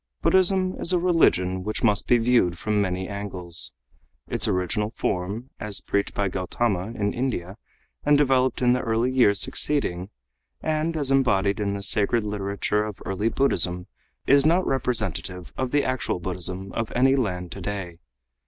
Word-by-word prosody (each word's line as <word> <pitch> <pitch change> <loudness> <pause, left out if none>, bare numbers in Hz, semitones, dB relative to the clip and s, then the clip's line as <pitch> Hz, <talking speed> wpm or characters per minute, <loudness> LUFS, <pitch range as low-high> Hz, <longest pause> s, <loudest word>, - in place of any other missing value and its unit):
Buddhism 185 0 +3
is 170 - -1
a - - +4
religion 95 - +2
which 110 +2 -4
must 105 -3 +2
be 120 - +5
viewed 115 -7 +2
from 105 +3 0
many 95 -1 -2
angles. 90 -9 -2 0.6
Its - - +1
original 90 +3 -1
form, 100 +4 -3
as 105 -2 -4
preached 100 0 -2
by 100 - 0
Gautama 95 +1 -2
in 100 0 0
India 105 -8 -3 0.5
and 145 0 +4
developed 130 -3 +2
in 125 0 +4
the 125 - +1
early 115 +2 0
years 120 -6 +3
succeeding, 95 -12 +2 0.5
and 160 +1 -1
as 140 -3 +2
embodied 100 -7 +2
in 100 -1 -1
the 100 - -5
sacred 105 +3 +2
literature 105 0 -1
of 105 -3 -6
early 100 +4 -1
Buddhism, 90 -10 +1 0.4
is 140 0 +5
not 170 +5 +3
representative 95 -9 -2
of 130 -1 -2
the 145 +2 +1
actual 130 -7 -2
Buddhism 90 +2 -3
of 115 -2 -3
any 135 +2 +4
land 90 -9 -2
today. 95 -3 -6
105 Hz, 155 wpm, -24 LUFS, 95-130 Hz, 0.6 s, be